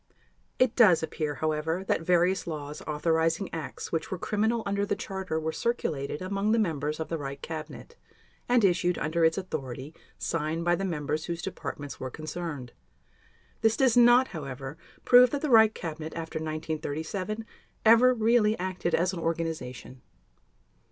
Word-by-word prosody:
It 255 -2 +3
does 185 -10 +6
appear, 155 -2 -3
however, 155 +4 -1
that 195 - 0
various 180 +2 +2
laws 150 -2 -5
authorizing 160 +4 0
acts 160 -2 -6
which 165 - -2
were 185 - -3
criminal 220 +5 0
under 200 0 0
the 205 - 0
Charter 190 -5 -4
were 160 0 -2
circulated 155 - -2
among 200 +3 0
the - - +3
members 155 -7 -1
of 160 - -3
the 165 - -2
Reich 140 -1 -6
Cabinet 160 - -7 0.5
and 245 -2 +4
issued 180 -1 +2
under 165 +2 0
its 160 0 +4
authority 140 -6 -5 0.2
signed 165 +1 -2
by 175 - +3
the 190 - -1
members 155 -3 -2
whose 170 -1 -4
departments 145 -6 -6
were 130 - -4
concerned. 155 -3 -6 0.9
This 225 0 +3
does 260 -4 +3
not, 245 +1 +6
however, 135 -2 -6 0.3
prove 250 0 +8
that 285 +2 -3
the 300 - 0
Reich 220 -2 +6
Cabinet, 160 -1 -6
after 160 -1 -4
1937, 160 +6 -4 0.4
ever 230 +3 +7
really 225 -1 +3
acted 180 -2 -1
as 180 +3 +1
an 175 - -4
organization. 160 -7 -4
165 Hz, 155 wpm, -28 LUFS, 155-200 Hz, 0.9 s, prove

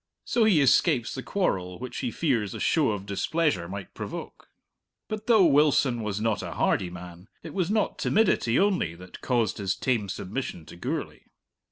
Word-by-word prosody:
So 235 -2 +2
he 190 -9 +5
escapes 135 -2 +3
the 130 - -4
quarrel 90 - -1
which 125 0 -7
he 125 - -1
fears 115 - -1
a - - -5
show 155 -6 +2
of 100 -2 -3
displeasure 100 - 0
might 95 0 -7
provoke. - - -8 0.6
But 215 0 -5
though 220 -6 +6
Wilson 140 -5 +3
was 105 -1 -3
not 110 -2 0
a - - -5
hardy 90 - +1
man, 90 +1 -10 0.2
it 160 - -8
was 185 -3 0
not 215 0 0
timidity 190 - +2
only 190 - +1
that 90 +1 -12
caused 120 -5 0
his 95 -2 -1
tame 115 -6 -1
submission 95 -3 -5
to - - -12
Gourlay. 85 - -5
120 Hz, 175 wpm, -27 LUFS, -, 0.6 s, though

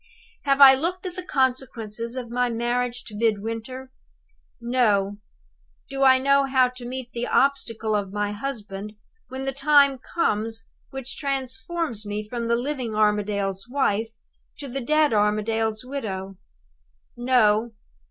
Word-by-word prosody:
"Have 275 0 +3
I 270 -1 +11
looked 345 +8 -2
at 360 -1 -5
the 370 - -4
consequences 250 - -1
of 245 -3 -6
my 245 0 +1
marriage 240 +1 -1
to 210 - -10
Midwinter? 225 +4 -2 0.7
No! 215 -5 +1 0.7
Do 275 0 -3
I 260 -1 +7
know 275 +1 +3
how 260 -2 +3
to 250 -1 -9
meet 255 -1 -6
the 240 0 -3
obstacle 230 -5 +1
of 200 -2 -2
my 205 0 -1
husband, 210 -3 -5 0.3
when 265 +1 -6
the 270 - 0
time 280 -1 +4
comes 225 -9 -2 0.2
which 270 -1 -5
transforms 270 -1 -3
me 210 0 -4
from 235 +1 -4
the 235 - +3
living 250 -3 -3
Armadale's 205 -2 0
wife 230 -5 0 0.5
to 280 - -6
the 270 +1 -4
dead 305 +1 +3
Armadale's 215 +2 +1
widow? 195 -8 -5 0.8
"No! 235 -2 +2
240 Hz, 135 wpm, -24 LUFS, 215-270 Hz, 0.8 s, I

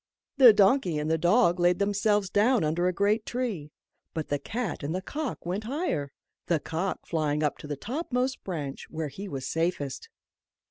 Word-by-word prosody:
The 255 -4 +10
donkey 200 - +3
and 150 +1 -1
the 160 - +2
dog 175 0 +4
laid 175 0 +4
themselves 205 -1 +1
down 225 +2 +3
under 165 +4 +1
a - - +2
great 205 +4 +1
tree, 220 -13 -3 0.5
but 160 -2 -3
the 145 - 0
cat 225 - -4
and 150 +4 -3
the 185 - -2
cock 290 - -4
went 190 +5 -3
higher 230 - -2 0.4
the 170 -3 +2
cock 170 +5 -3
flying 155 -2 0
up 150 - 0
to - - -9
the 145 -1 -4
topmost 255 - -2
branch, 150 -7 -5
where 155 -2 -4
he 195 +9 -7
was 135 -6 -5
safest. 165 - -2
180 Hz, 180 wpm, -28 LUFS, 155-220 Hz, 0.5 s, The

